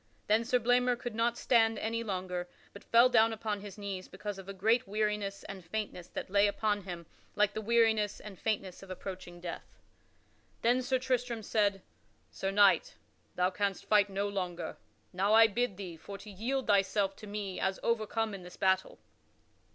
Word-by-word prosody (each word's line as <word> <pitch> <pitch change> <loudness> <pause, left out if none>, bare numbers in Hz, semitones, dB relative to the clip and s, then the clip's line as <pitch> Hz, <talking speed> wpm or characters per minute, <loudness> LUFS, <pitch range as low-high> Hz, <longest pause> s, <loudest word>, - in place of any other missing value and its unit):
Then 215 +2 +3
Sir 250 +2 +2
Blamor 245 +1 +3
could 240 -1 -5
not 230 +2 +1
stand 225 -3 +3
any 230 +1 -2
longer, 180 -3 -3 0.2
but 200 - -11
fell 235 +2 +6
down 225 -2 +4
upon 215 -2 -3
his 205 0 -9
knees 195 -2 -5
because 205 -2 -6
of 195 0 -10
a - - -2
great 220 +4 +2
weariness 210 -1 -1
and 195 -2 -8
faintness 180 -1 -4
that - - -6
lay 200 +1 +5
upon 205 -1 0
him 175 -3 -6 0.3
like 205 0 +3
the 220 - -3
weariness 220 -2 +2
and 205 -4 -10
faintness 195 -4 -2
of 195 - -12
approaching 185 -1 -7
death. 175 -1 -8 0.9
Then 245 +2 +4
Sir 260 +1 +1
Tristram 250 -3 -1
said: 200 -3 +1 0.5
"Sir 195 - -3
Knight, 205 - +4 0.4
thou 180 +1 +2
canst 200 0 -2
fight 205 -1 +4
no 200 +1 -1
longer. 180 -4 -3 0.4
Now 195 +4 +3
I 225 0 +9
bid 225 -2 0
thee 180 -4 -7
for 200 +5 -8
to 210 +1 -11
yield 250 +7 -2
thyself 195 -1 +2
to 215 - -10
me 200 -2 -4
as 190 0 0
overcome 225 -1 0
in 195 - -7
this 180 0 -12
battle." 190 0 +1
205 Hz, 180 wpm, -32 LUFS, 195-225 Hz, 0.9 s, I